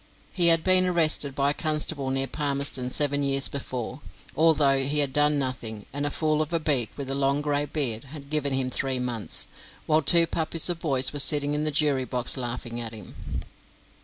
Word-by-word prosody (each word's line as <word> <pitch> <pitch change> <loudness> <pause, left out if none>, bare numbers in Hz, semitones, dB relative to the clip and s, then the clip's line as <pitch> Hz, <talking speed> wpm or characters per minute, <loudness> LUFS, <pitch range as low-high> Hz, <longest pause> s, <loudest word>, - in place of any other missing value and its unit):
He 175 -3 +3
had 165 -1 +5
been 185 0 +5
arrested 155 -5 +2
by 140 0 +2
a - - -2
constable 150 -3 -2
near 135 0 +1
Palmerston 140 -2 -2
seven 145 +1 +1
years 135 0 +2
before, 130 -1 -6 0.3
although 150 -4 +3
he 145 +3 -1
had 140 -3 +1
done 150 +1 +2
nothing, 120 -6 -4
and 145 +1 -2
a - - -1
fool 155 +1 0
of 155 +1 -3
a 165 - 0
beak, 140 -7 +1
with 140 - -5
a - - -1
long 140 +1 0
grey 145 0 -1
beard, 135 -6 -2
had 140 0 -12
given 150 -2 0
him 130 -1 -1
three 135 +1 -2
months, 120 -3 -2 0.4
while 155 0 +2
two 170 +3 +5
puppies 165 +1 0
of 170 - -6
boys 135 -5 0
were 145 - -3
sitting 145 0 +4
in 150 +1 -1
the - - +1
jury 145 -3 0
box 125 -1 +3
laughing 120 -2 -5
at 115 -1 -6
him. 105 - -8
140 Hz, 200 wpm, -25 LUFS, 130-155 Hz, 0.4 s, had